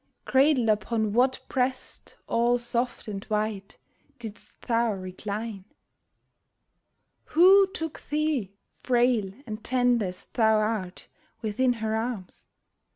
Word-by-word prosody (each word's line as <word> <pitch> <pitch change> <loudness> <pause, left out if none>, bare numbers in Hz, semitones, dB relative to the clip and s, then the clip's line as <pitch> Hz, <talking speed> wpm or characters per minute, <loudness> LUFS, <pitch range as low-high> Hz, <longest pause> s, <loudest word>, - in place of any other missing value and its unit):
Cradled 265 -3 +3
upon 215 0 +1
what 260 +3 +2
breast 255 0 -3
all 240 +1 +2
soft 240 0 -2
and 200 -2 -5
white 210 -2 -3 0.4
Didst 225 -3 -10
thou 230 -2 +1
recline? 200 +2 -5 1.6
Who 380 +4 +6
took 325 -4 -5
thee, 300 -9 0 0.3
frail 240 -5 +2
and 215 -1 -7
tender 245 -4 +2
as 180 0 -9
thou 220 -2 +4
art, 215 -4 -2 0.4
Within 245 +4 +1
her 220 -1 -2
arms? 220 -4 -5
230 Hz, 105 wpm, -27 LUFS, 210-250 Hz, 1.6 s, Who